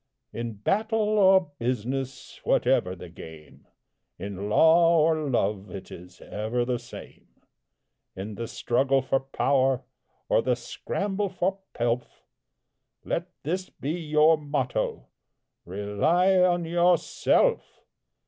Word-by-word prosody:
In 115 Hz, 0 st, -4 dB
battle 215 Hz, -, 0 dB
or 190 Hz, -4 st, +5 dB
business, 125 Hz, +2 st, -3 dB
whatever 90 Hz, 0 st, +2 dB
the 90 Hz, -, -10 dB
game, 80 Hz, -2 st, -13 dB, 0.5 s
In 100 Hz, 0 st, -5 dB
law 165 Hz, +7 st, +5 dB
or 155 Hz, -1 st, +2 dB
love, 100 Hz, -5 st, -1 dB
it 95 Hz, +1 st, -9 dB
is 90 Hz, +1 st, -12 dB
ever 110 Hz, +4 st, -2 dB
the 125 Hz, -1 st, -1 dB
same; -, -, -12 dB, 0.9 s
In 100 Hz, +3 st, -6 dB
the 115 Hz, +2 st, -5 dB
struggle 135 Hz, +3 st, +1 dB
for 135 Hz, +1 st, +1 dB
power, 135 Hz, -1 st, +1 dB, 0.4 s
or -, -, +3 dB
the 125 Hz, 0 st, +1 dB
scramble 195 Hz, +11 st, -3 dB
for 185 Hz, +1 st, -1 dB, 0.2 s
pelf, 120 Hz, +1 st, -2 dB, 0.8 s
Let 170 Hz, +1 st, -2 dB, 0.2 s
this 185 Hz, +5 st, -3 dB
be 145 Hz, -, -5 dB
your 155 Hz, -1 st, +3 dB
motto, 140 Hz, -, -2 dB, 0.6 s
"RELY 155 Hz, -, +2 dB
ON 175 Hz, -1 st, +1 dB
YOURSELF!" 175 Hz, +1 st, +2 dB
135 Hz, 110 wpm, -26 LUFS, 110-175 Hz, 0.9 s, or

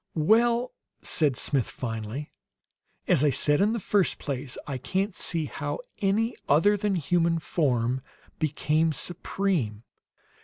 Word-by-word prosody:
"Well," 235 Hz, +9 st, +3 dB, 0.3 s
said 145 Hz, -6 st, +2 dB
Smith 135 Hz, -6 st, +1 dB
finally, 115 Hz, +4 st, -5 dB, 0.8 s
"as 135 Hz, -, +4 dB
I 150 Hz, -, +5 dB
said 145 Hz, +3 st, +2 dB
in 210 Hz, +3 st, +3 dB
the 235 Hz, -, -1 dB
first 200 Hz, -2 st, +1 dB
place, 135 Hz, -2 st, -4 dB
I 135 Hz, -3 st, -4 dB
can't 190 Hz, -, -1 dB
see 165 Hz, -3 st, 0 dB
how -, -, -4 dB, 0.2 s
any 215 Hz, +4 st, +1 dB
other 165 Hz, +9 st, +5 dB
than 205 Hz, 0 st, 0 dB
the 180 Hz, -, 0 dB
human 170 Hz, +2 st, +2 dB
form 130 Hz, -6 st, 0 dB, 0.4 s
became 155 Hz, +1 st, +1 dB
supreme. 165 Hz, -, -1 dB
155 Hz, 130 wpm, -27 LUFS, 135-195 Hz, 0.8 s, I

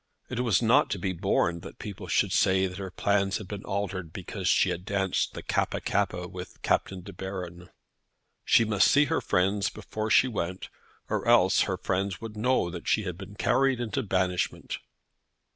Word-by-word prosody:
It -, -, -2 dB
was 120 Hz, -3 st, +2 dB
not 130 Hz, +6 st, +4 dB
to 100 Hz, -, -1 dB
be 95 Hz, +1 st, -2 dB
borne 85 Hz, -2 st, +1 dB
that -, -, -11 dB
people 100 Hz, -2 st, -7 dB
should 90 Hz, +3 st, +2 dB
say 95 Hz, +1 st, +3 dB
that 90 Hz, 0 st, -5 dB
her 95 Hz, -1 st, -5 dB
plans 100 Hz, +1 st, +1 dB
had 105 Hz, -, -8 dB
been 105 Hz, 0 st, -6 dB
altered 95 Hz, -4 st, -3 dB
because 95 Hz, +1 st, -5 dB
she 90 Hz, -, +4 dB
had 90 Hz, 0 st, -4 dB
danced 95 Hz, -1 st, -1 dB
the -, -, -6 dB
Kappa -, -, 0 dB
kappa 90 Hz, 0 st, -1 dB
with 90 Hz, 0 st, -9 dB
Captain 95 Hz, -1 st, 0 dB
De 100 Hz, +2 st, -10 dB
Baron. 90 Hz, -2 st, -7 dB, 0.7 s
She 115 Hz, -, +4 dB
must 105 Hz, -2 st, +4 dB
see 145 Hz, +1 st, +5 dB
her -, -, 0 dB
friends 100 Hz, +3 st, +1 dB
before 110 Hz, +1 st, -5 dB
she 130 Hz, -, +5 dB
went, 95 Hz, -6 st, -4 dB, 0.4 s
or -, -, -2 dB
else 115 Hz, -6 st, +5 dB
her 90 Hz, -, -1 dB
friends 95 Hz, +1 st, -2 dB
would 110 Hz, -1 st, -7 dB
know 110 Hz, -5 st, +1 dB
that 85 Hz, -1 st, -8 dB
she 110 Hz, -, +2 dB
had 90 Hz, -3 st, -4 dB
been 95 Hz, +2 st, -10 dB
carried 135 Hz, +3 st, +2 dB
into 120 Hz, +3 st, -2 dB
banishment. 95 Hz, -4 st, -1 dB
95 Hz, 185 wpm, -28 LUFS, 90-105 Hz, 0.7 s, see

